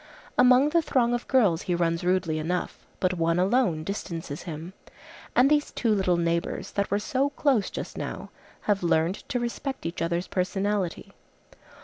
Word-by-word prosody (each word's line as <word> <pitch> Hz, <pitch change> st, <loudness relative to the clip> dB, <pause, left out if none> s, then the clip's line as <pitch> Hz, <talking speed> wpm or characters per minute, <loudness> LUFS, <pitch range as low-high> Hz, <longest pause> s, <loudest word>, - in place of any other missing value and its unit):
Among 250 Hz, +3 st, +6 dB
the 335 Hz, +2 st, +3 dB
throng 255 Hz, -6 st, +1 dB
of 240 Hz, -, -2 dB
girls 205 Hz, -11 st, +3 dB
he 175 Hz, -, -1 dB
runs 170 Hz, -1 st, 0 dB
rudely 180 Hz, -3 st, +1 dB
enough, 175 Hz, +3 st, -3 dB
but 185 Hz, 0 st, +1 dB
one 165 Hz, -1 st, +1 dB
alone 185 Hz, -4 st, +2 dB
distances 165 Hz, -5 st, -5 dB
him; 165 Hz, +2 st, -7 dB, 0.6 s
and 250 Hz, +2 st, +6 dB
these 295 Hz, 0 st, +2 dB
two 230 Hz, -3 st, +1 dB
little 185 Hz, -3 st, +2 dB
neighbors, 170 Hz, 0 st, -1 dB
that 200 Hz, -1 st, -1 dB
were 200 Hz, -, +2 dB
so 260 Hz, +7 st, 0 dB
close 280 Hz, -7 st, +1 dB
just -, -, -6 dB
now, -, -, -6 dB, 0.3 s
have 205 Hz, -2 st, +1 dB
learned 170 Hz, +1 st, +2 dB
to 245 Hz, -, 0 dB
respect 240 Hz, +2 st, -4 dB
each 170 Hz, +2 st, -4 dB
other's 170 Hz, +2 st, 0 dB
personality. 195 Hz, 0 st, -2 dB
190 Hz, 160 wpm, -26 LUFS, 170-240 Hz, 0.6 s, Among